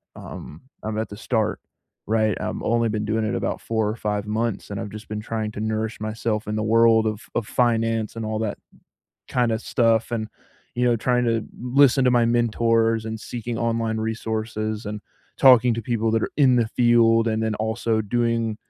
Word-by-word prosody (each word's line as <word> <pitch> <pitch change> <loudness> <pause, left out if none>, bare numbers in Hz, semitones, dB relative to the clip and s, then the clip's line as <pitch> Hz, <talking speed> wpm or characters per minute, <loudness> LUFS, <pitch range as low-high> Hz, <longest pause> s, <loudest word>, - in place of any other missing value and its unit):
Um, 80 - -10 0.2
I'm 110 0 -3
at 110 - -1
the 105 - -9
start, 110 -1 -1 0.5
right? 110 -2 +2
I've - - -3
only 115 0 +1
been 105 0 -2
doing 110 +1 0
it 110 +3 -1
about - - -2
4 110 -2 -1
or 105 - -2
5 105 -2 -2
months, 110 -1 -2
and 100 - -4
I've 110 -2 -5
just 110 +2 -10
been 105 0 -4
trying 110 -1 -3
to 105 - -8
nourish 110 +1 -2
myself 110 0 -2
in 105 - -2
the 110 - -1
world 115 0 +4
of 110 0 -2
of 120 - 0
finance 115 -2 0
and 115 -1 -4
all 110 0 -2
that 110 -2 -2 0.7
kinda 120 -3 +1
stuff, 115 -1 +1
and, 110 -2 -2 0.5
you 125 - +1
know, 120 -1 +4
trying 125 +2 +1
to 115 -2 0 0.2
listen 130 +2 +4
to 125 - +4
my 120 -1 +4
mentors 115 -1 +2
and 110 0 -4
seeking 120 0 -5
online 115 -1 -1
resources 110 -1 -3
and 105 0 -5 0.4
talking 125 -2 +6
to 115 - -4
people 115 -1 0
that 115 -1 +1
are - - -2
in 135 -4 +5
the 115 -2 +2
field, 115 -1 +4
and 110 0 -1
then 110 -1 0
also 110 0 -1
doing 115 0 0
115 Hz, 195 wpm, -23 LUFS, 110-115 Hz, 0.7 s, talking